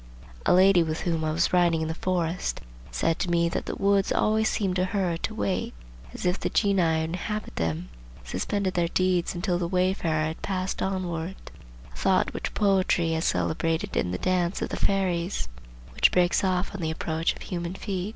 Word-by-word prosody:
A - - +6
lady 190 -1 +6
with 160 -1 -2
whom 165 -2 -1
I 155 - 0
was 170 +4 +1
riding 175 -2 +3
in - - -2
the 160 - -2
forest 175 0 -1 0.3
said 165 0 0
to 180 - -1
me 170 -1 +2
that - - -3
the - - -3
woods 200 -1 +2
always 220 0 +2
seemed 190 -4 0
to 180 - +2
her 185 -3 0
to 220 +5 -4
wait, 190 - -2 0.4
as - - -7
if 180 +2 +1
the - - -1
genii 200 -3 +2
who 160 -1 +2
inhabit 185 +6 -4
them 80 +1 -2 0.3
suspended 185 - -2
their 170 -1 +1
deeds 180 0 +1
until 175 0 0
the 175 - -1
wayfarer 180 -3 +1
had 160 +1 -5
passed 185 -1 -2
onward; 185 -2 -2 0.6
a - - -15
thought - - +2
which - - -4
poetry 185 -4 +2
has 160 +1 0
celebrated 165 0 0
in 90 - +1
the 90 - -2
dance 180 - 0
of - - -3
the - - -3
fairies, 180 - 0 0.5
which - - +4
breaks 180 +1 +3
off 185 0 0
on 200 - -5
the 160 - -1
approach 160 +1 -1
of - - -10
human 175 0 -4
feet. 195 -1 -3
180 Hz, 195 wpm, -26 LUFS, 165-190 Hz, 0.6 s, A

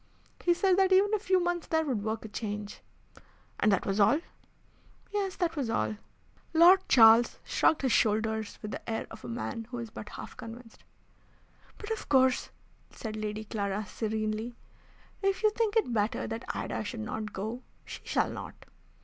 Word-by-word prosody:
He 350 -1 +4
said 375 0 +3
that 380 0 +4
even 400 +3 +5
a 430 - +3
few 380 -2 +2
months 350 -1 -1
there 320 -1 +1
would 250 -8 -1
work 220 +1 -3
a - - -4
change." 210 -1 -5 0.8
"And 210 - +4
that 195 - +1
was 195 +1 -1
all?" 245 +9 +5 0.9
"Yes, 395 -2 -1
that 340 -3 -1
was 270 -6 -2
all." 215 -1 0 0.6
Lord 350 +4 +8
Charles 230 -1 +7
shrugged 310 - +2
his 260 - +2
shoulders 220 -1 +1
with 210 - -5
the - - -7
air 225 - -2
of - - -11
a - - -7
man 120 - -4
who 245 - -5
is 230 -2 -6
but 210 - -8
half - - -9
convinced. 230 0 -11 0.9
"But 420 +1 -7
of 445 - -4
course," 260 -2 +3 0.4
said 220 -2 -6
Lady 215 0 -4
Clara, 205 -1 -2
serenely, 220 +2 -3 0.7
"if 390 0 0
you 430 - +5
think 440 0 0
it 335 - +1
better 210 0 0
that 225 0 -5
Ida - - -3
should 215 +2 -5
not 215 0 -4
go 220 +6 -4 0.2
she - - -8
shall - - 0
not. - - -7
225 Hz, 175 wpm, -30 LUFS, 215-345 Hz, 0.9 s, Lord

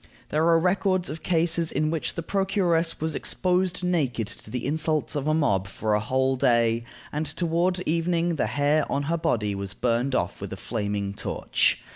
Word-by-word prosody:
There 155 +2 +2
are 165 -1 +6
records 185 0 +1
of 155 +1 -7
cases 165 -1 +1
in 155 0 0
which 165 -2 -2
the 165 - -3
procuress 180 -3 +1
was 160 0 -1
exposed 180 +1 0
naked 145 -11 0
to - - -9
the 125 +2 -4
insults 155 +2 0
of 145 -1 -1
the 155 - +2
mob 100 - +1
for 105 +2 -2
a 105 - +3
whole 130 +4 +1
day, 120 -3 +2 0.3
and 150 +1 -2
toward 170 +3 0
evening 170 0 0
the - - +1
hair 145 +1 +1
on 140 - 0
her 165 +4 0
body 105 -9 0
was 100 -1 -4
burned 125 +2 0
off - - -1
with - - -5
a - - -6
flaming 100 -3 -3
torch. - - +1
155 Hz, 185 wpm, -26 LUFS, 120-170 Hz, 0.3 s, are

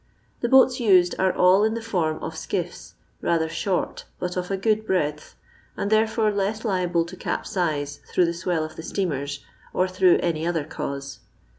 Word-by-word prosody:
The 235 - -1
boats 265 0 +6
used 185 -6 +4
are 190 0 +3
all 185 +3 +4
in 220 +1 +1
the - - -2
form 170 -8 0
of - - -4
skitf:*, - - -4 0.3
rather 165 -1 +1
short, 180 +3 -2
but 180 0 -3
of 180 -1 -3
a 195 - -1
good 215 +2 +1
breadth, 150 -7 -2 0.4
and 200 - -2
therefore 220 0 +3
less 205 +3 -2
liable 180 -4 +1
to 175 +2 -9
capsize 150 -6 -2
through 180 - +4
the 170 - -1
swell 170 -2 -1
of 155 0 -7
the - - -5
steamers, 145 -6 -3 0.3
or 185 - +2
through 185 -1 +4
any 165 -1 0
other 170 -3 0
cause. 140 -2 -6
180 Hz, 175 wpm, -24 LUFS, 160-200 Hz, 0.4 s, boats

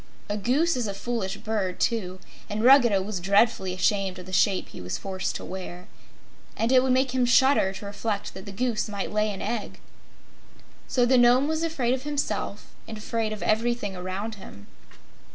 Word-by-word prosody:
A 205 - -1
goose 275 +11 +1
is 245 -3 -1
a 200 - -4
foolish 200 -3 -3
bird, 210 -5 -2
too, 190 -6 -1 0.3
and 215 +1 -2
Ruggedo 240 -7 +6
was 200 -1 -4
dreadfully 200 +1 +2
ashamed 190 0 0
of 180 - -9
the 185 - -10
shape 190 +1 +2
he - - -10
was 90 0 -4
forced 190 -1 -4
to - - -5
wear. 180 -1 -7 0.7
And 230 +2 0
it 255 -1 +6
would 260 0 +1
make 260 0 +2
him 255 0 +1
shudder 250 -4 +4
to 195 +2 -8
reflect 205 0 -3
that 190 +1 -10
the - - -6
Goose 230 +1 -1
might 200 -2 -4
lay 215 0 +1
an 195 - -6
egg! 220 0 -4 1.1
So 250 -2 +2
the 255 +1 +4
Nome 245 +3 +5
was 315 +1 -1
afraid 285 -7 0
of 260 - -2
himself 280 -7 -3 0.2
and 220 - -7
afraid 220 +1 -2
of 215 - -5
everything 220 -2 0
around 185 +5 -4
him. 100 0 -12
215 Hz, 190 wpm, -26 LUFS, 190-245 Hz, 1.1 s, Ruggedo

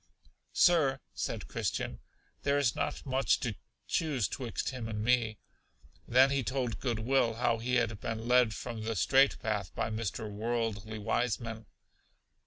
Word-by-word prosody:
Sir, 150 -7 +4
said - - -3
Christian, - - -2 0.4
there 140 0 +2
is 140 -6 +2
not - - -2
much 135 0 +2
to 120 -4 -1 0.3
choose 145 - +1
twixt 125 0 -3
him 125 -4 -5
and 105 -1 -3
me. 115 -2 +2 0.7
Then 130 +3 +6
he 140 -1 +1
told 130 -2 -2
Good 120 -4 -1
will 115 0 +2
how 115 -1 +1
he 125 +2 0
had 115 -4 +1
been 115 +1 -4
led 125 -3 +4
from 115 0 -5
the 110 +1 -2
straight 135 +7 +4
path 105 -4 -2
by - - -1
Mr. 110 0 -3
Worldly 110 0 -2
Wiseman. 110 0 -2
115 Hz, 150 wpm, -31 LUFS, 110-130 Hz, 0.7 s, Then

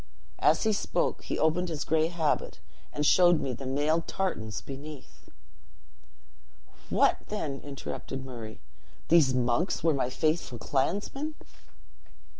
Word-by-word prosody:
As 160 - +4
he 220 -1 +3
spoke, 200 - -1
he - - -2
opened 170 +3 +2
his 155 -3 -3
gray 160 0 +2
habit, 165 -3 -1 0.3
and 150 - -1
showed 175 0 +6
me 130 - -2
the 130 +2 -6
mailed 150 +5 +1
tartans 110 - -2
beneath." 140 +1 -10 1.6
"What, - - +4
then!" 150 -10 -3
interrupted 135 -1 -6
Murray, 115 - -8 0.5
"these 150 -6 +5
monks 125 +8 +1
were 165 -1 +4
my 130 -3 0
faithful 155 -2 0
clansmen?" 205 - -1
150 Hz, 120 wpm, -29 LUFS, 130-170 Hz, 1.6 s, showed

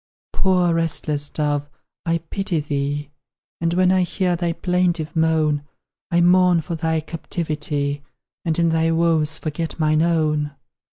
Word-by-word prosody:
Poor 180 -3 +2
restless 155 -3 0
dove, 145 -1 -1 0.4
I 165 0 +2
pity 195 -4 -1
thee; 145 0 -2 0.5
And 170 +1 0
when 185 0 +4
I 185 0 +3
hear 180 0 0
thy 170 0 -1
plaintive 175 -2 0
moan, 160 -2 +2 0.5
I 170 -1 +3
mourn 180 -1 +5
for 160 +2 -6
thy 160 -1 0
captivity, 150 -3 -3 0.4
And 165 -2 0
in 170 -1 +3
thy 160 0 +2
woes 160 -2 +2
forget 160 +2 -4
mine 155 0 +3
own. 155 -3 +1
160 Hz, 135 wpm, -21 LUFS, 150-170 Hz, 0.5 s, mourn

